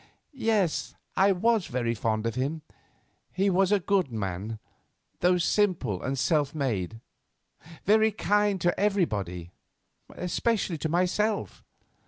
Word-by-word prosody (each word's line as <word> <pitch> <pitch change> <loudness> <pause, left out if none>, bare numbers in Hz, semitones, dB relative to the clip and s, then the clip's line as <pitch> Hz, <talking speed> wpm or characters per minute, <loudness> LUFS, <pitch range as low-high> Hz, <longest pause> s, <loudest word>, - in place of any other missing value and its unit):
"Yes, 220 - 0 0.2
I 195 +1 +4
was 215 +1 +2
very 120 -2 -1
fond 110 -1 -1
of 115 - -1
him. 140 +6 -2 0.7
He 195 +1 +1
was 190 +1 +2
a 205 - +4
good 185 -6 +1
man, 105 0 -4 0.6
though 180 +1 +3
simple 170 - +1
and 135 +1 -2
self 145 +3 +1
made; 115 - -2 0.9
very 220 +1 +4
kind 205 -1 +1
to 175 - +1
everybody; 105 - -1 0.7
especially 180 -1 -1
to 160 - -2
myself." 185 +5 0
175 Hz, 120 wpm, -27 LUFS, -, 0.9 s, I